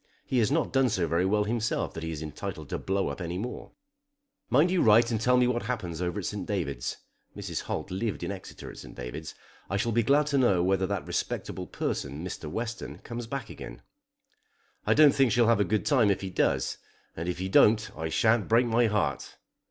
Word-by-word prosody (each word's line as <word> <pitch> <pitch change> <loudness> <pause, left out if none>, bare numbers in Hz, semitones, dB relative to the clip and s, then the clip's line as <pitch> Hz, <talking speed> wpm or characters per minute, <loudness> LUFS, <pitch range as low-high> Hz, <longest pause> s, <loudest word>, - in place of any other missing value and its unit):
He 130 - +1
has 115 +2 +2
not 160 +1 0
done 135 -1 +4
so 90 -6 0
very 85 +3 +1
well 105 +1 +2
himself 115 +2 -1
that 80 - -6
he 80 - -4
is 80 -1 -5
entitled 75 -2 -6
to - - -3
blow 95 -2 -1
up 70 - -6
anyone. 90 +8 -5 0.8
"Mind 145 +9 +4
you 185 -2 +2
write 115 +2 +5
and 110 -2 -1
tell 125 +1 +4
me 125 - +4
what 120 -1 0
happens 90 -9 -4
over 90 +2 -2
at - - -6
St. 105 - -4
David's." 80 -11 -2 0.4
(Mrs. - - -4
Holt - - -4
lived 105 +3 -2
in - - -2
Exeter 95 -2 -8
at - - -12
St. - - -11
David's.) 60 +6 -7 0.3
"I 95 - 0
shall 115 +3 0
be 115 +1 +3
glad 140 +6 +3
to 140 -1 +1
know 100 -9 +3
whether 95 0 +2
that 100 -1 -3
respectable - - -3
person, 70 +5 -3
Mr. 85 -4 -6
Western, 115 +7 -5
comes 120 -1 -7
back 130 -2 -5
again. - - -9 1.0
I - - +4
don't 150 -2 +7
think 135 -4 +3
she'll 120 +1 +4
have 115 -1 +4
a - - +5
good 105 +2 0
time 125 -8 +4
if 100 - +1
he 95 -1 -5
does, - - 0 0.4
and 85 +2 -3
if 90 - -2
he 95 +1 -3
don't 110 +3 +4
I 80 0 -3
sha'n't 110 +3 +2
break 115 +2 +4
my 115 0 +3
heart." 105 -1 -1
105 Hz, 215 wpm, -28 LUFS, 90-120 Hz, 1.0 s, don't